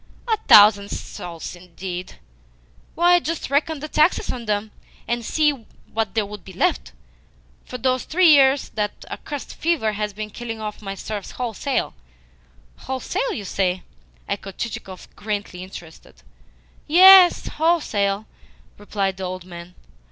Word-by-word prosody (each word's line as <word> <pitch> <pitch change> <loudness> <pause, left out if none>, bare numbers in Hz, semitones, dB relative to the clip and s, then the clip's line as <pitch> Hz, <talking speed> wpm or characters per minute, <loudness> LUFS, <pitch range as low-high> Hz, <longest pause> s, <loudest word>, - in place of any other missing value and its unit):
A 445 -2 +2
thousand 205 -1 +7
souls, 170 0 -7
indeed! 180 +1 -7 0.8
Why, 350 +1 +5
just 330 -4 -4
reckon 300 +1 0
the 305 - -5
taxes 305 +3 +2
on 240 -2 -6
them, 210 0 -1 0.4
and 240 0 -1
see 300 +6 +2 0.4
what 220 -3 -2
there 220 -2 +1
would 205 -2 -10
be 190 - -12
left! - - -1 0.7
For 250 - -7
these 255 +1 0
three 350 +1 +4
years 275 -1 +4
that 210 -1 -4
accursed 290 -3 -6
fever 310 -10 0
has 210 0 -3
been 210 +1 -7
killing 225 -1 -6
off 215 -1 -6
my 195 -1 -5
serfs 205 0 -6
wholesale." 250 +2 -2 0.8
"Wholesale, 265 - -3
you 205 - -6
say?" 185 -1 -1 0.4
echoed 195 -1 -5
Chichikov, 190 -5 -6
greatly 205 -3 -4
interested. 175 -3 -12 0.6
"Yes, 365 +3 +8
wholesale," 220 -11 0 0.5
replied 200 -2 -2
the 190 - -6
old 185 -1 -6
man. 175 0 -11
215 Hz, 135 wpm, -22 LUFS, 195-285 Hz, 0.8 s, Yes